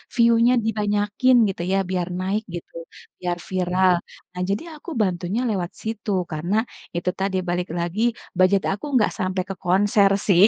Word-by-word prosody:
"view-nya 235 0 +5
dibanyakin," 210 +3 +2
gitu 185 - -4
ya, 195 - +3
biar 180 -2 -1
naik, 195 +4 -1
gitu, 175 - -8 0.5
biar 175 -1 -1
viral. 185 0 +2 0.4
Nah, 180 - -4
jadi 200 +7 -1
aku 305 - -10
bantunya 185 +3 0
lewat 185 -5 -2
situ, 220 -1 -4 0.2
karena, 170 +6 -1 0.4
itu 175 +1 0
tadi, 190 0 0
balik 175 +1 -1
lagi, 170 +5 -2 0.4
budget 185 +1 +4
aku 200 +8 -4
nggak 210 - +3
sampai 185 -1 0
ke 195 - -3
konser 200 +2 +4 0.2
sih. 190 -1 +7
190 Hz, 155 wpm, -23 LUFS, 180-210 Hz, 0.5 s, sih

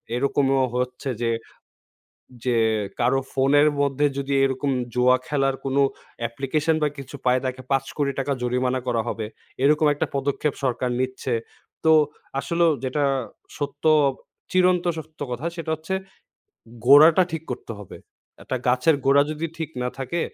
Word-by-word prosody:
এরকমও 135 +1 +2
হচ্ছে 125 +2 -2
যে, 115 -1 +1 1.1
যে 125 -2 +2 0.4
কারো 135 +2 +3
ফোনের 140 +2 +4
মধ্যে 140 +1 +1
যদি 140 0 -2
এরকম 135 +1 0 0.2
জুয়া 125 +1 +4
খেলার 135 -2 +1
কোনো 135 +1 +2 0.4
অ্যাপ্লিকেশন 135 +7 0
বা - - +4
কিছু 140 +1 -8
পায় 125 0 +4
তাকে 130 0 -3
৫ 135 -1 +2
কোটি 145 -2 +1
টাকা 135 +1 -1
জরিমানা 125 +1 0
করা 120 -2 +1
হবে। 110 -2 -3 0.4
এইরকম 150 +2 +4
একটা 145 - -2
পদক্ষেপ 140 +2 0
সরকার 125 -1 0
নিচ্ছে। 130 0 -2 0.5
তো 160 - +5 0.5
আসলেও 170 +4 +2
যেটা 135 +3 0 0.5
সত্য, 145 0 -5 0.7
চিরন্ত 180 -1 +3
সত্য 160 0 -10
কথা 125 +6 -4
সেটা 165 -2 -4
হচ্ছে 160 +5 -6 0.9
,গোড়াটা 155 +7 +8
ঠিক 160 -1 -4
করতে 125 -1 -6
হবে। 100 - -10 0.5
একটা 130 - -2
গাছের 125 +5 +4
গোড়া 140 +1 +6
যদি 155 +2 -3
ঠিক 160 -2 -4
না 125 - 0
থাকে, 135 +6 -3
135 Hz, 140 wpm, -24 LUFS, 130-150 Hz, 1.1 s, গোড়াটা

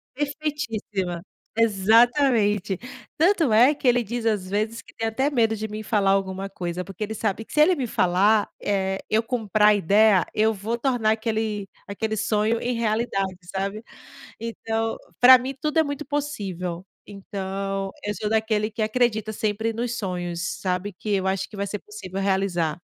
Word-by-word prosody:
Perfeitíssima, 260 - -3 0.4
exatamente. 220 -1 +3 0.4
Tanto 330 - +3
é 245 +7 +6
que 285 -3 -3
ele 245 0 +4
diz, 235 +2 -4
às 205 -5 0
vezes, 215 +3 -1
que - - -19
tem 225 - -2
até 265 +6 0
medo 230 -6 +2
de 220 0 -4
mim 215 0 -6
falar 205 -2 +2
alguma 195 0 -1
coisa, 180 -2 -4
porque 195 +2 -6
ele 215 +1 -4
sabe 220 0 -2
que - - -13
se 300 - +4
ele 355 +4 +5
me 265 -6 -2
falar, 200 +2 +3
eh, 190 -1 0
eu 220 +1 +2
comprar 220 -3 +2
a 210 - +5
ideia, 205 +1 +4
eu 220 +1 +2
vou 215 +3 -3
tornar 240 -3 +1
aquele 220 -2 -2 0.2
aquele 220 +2 -3
sonho 220 +1 +1
em 245 0 -1
realidade, 215 -4 -1 0.2
sabe. 195 +3 -2 0.6
Então, 225 0 -2 0.2
para 255 +1 +10
mim 260 +2 -4
tudo 305 +1 0
é - - +7
muito 285 -1 -4
possível. 195 -12 -4 0.2
Então, 195 0 -4
eu 210 0 -2
sou 210 - -1
daquele 220 -1 +1
que 220 0 -4
acredita 220 -1 +1
sempre 220 +1 -1
nos 240 +1 -3
sonhos, 175 -5 -3 0.2
sabe, 185 +2 -2
que 200 +4 -7
eu 190 -1 0
acho 190 0 -1
que 210 - -11
vai 200 - -2
ser 210 +1 -4
possível 195 -2 -7
realizar. 190 -5 0
215 Hz, 170 wpm, -24 LUFS, 195-230 Hz, 0.6 s, para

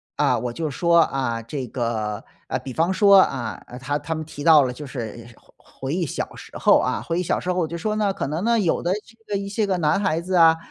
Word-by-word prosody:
啊， - - +2
我 120 -1 -4
就 160 +4 -3
说， 170 +4 +3
啊， 130 -7 0
这 130 +4 -5
个， 110 -4 -3 0.2
呃， - - -2
比 130 - -8
方 170 +6 +1
说， 200 -1 +7
啊， 130 -8 -2 0.2
他 145 +2 -1
他 150 +3 -4
们 160 - -4
提 145 -2 -8
到 160 -2 +7
了 125 - -1
就 145 +4 -8
是 115 -3 -7
回 - - -25 0.2
回 135 +2 -5
忆 180 -1 0
小 140 - -5
时 - - -12
候 - - +5
啊， - - -1
回 170 +1 -2
忆 - - 0
小 - - 0
时 180 - -2
候 - - -4
我 170 - +1
就 170 +2 -5
说 215 +5 -2
呢， 205 -2 +1
可 - - -3
能 155 +6 -3
呢， 230 +1 +3
有 175 -6 +1
的 175 - 0
这 225 - -20 0.2
个 - - +2
一 200 - -5
些 210 +1 0
个 190 -2 0
男 155 +2 +2
孩 180 -5 +1
子 185 +2 -2
啊， 165 -1 +6
160 Hz, 280 characters per minute, -23 LUFS, 130-185 Hz, 0.2 s, 说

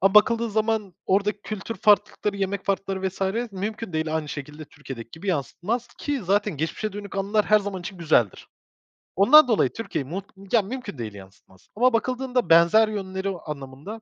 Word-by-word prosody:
Ama 195 +1 +3
bakıldığı 230 +2 +5
zaman 215 -3 0
oradaki 200 +2 +1
kültür 215 +1 -5
farklılıkları, 205 -1 +2
yemek 195 0 -2
farklılıkları 195 -1 -1
vs. 195 +5 -2
mümkün 210 +1 -4
değil, 160 0 -1
aynı 155 -2 -3
şekilde 150 +2 -7
Türkiye'deki 135 -6 -10
gibi 160 - -10
yansıtmaz 185 - -2
ki 290 -2 -2
zaten 200 -1 +1
geçmişe 165 +8 -3
dönük 200 -1 -7
anılar 205 +2 +1
her 215 - +6
zaman 200 -2 -5
için 185 +1 -8
güzeldir. 150 - +1 0.7
Ondan 265 +10 +8
dolayı 225 -4 +3
Türkiye'yi 145 -11 -4
mut 190 +4 -4 0.3
ya, 230 - +6
mümkün 215 - -6
değil 110 -3 -5
yansıtmaz. 95 -1 -16
Ama 250 +3 +3
bakıldığında 250 -2 0
benzer 170 +7 +6
yönleri 195 -2 -3 0.2
anlamında. 145 +8 -7
195 Hz, 165 wpm, -24 LUFS, 160-215 Hz, 0.7 s, Ondan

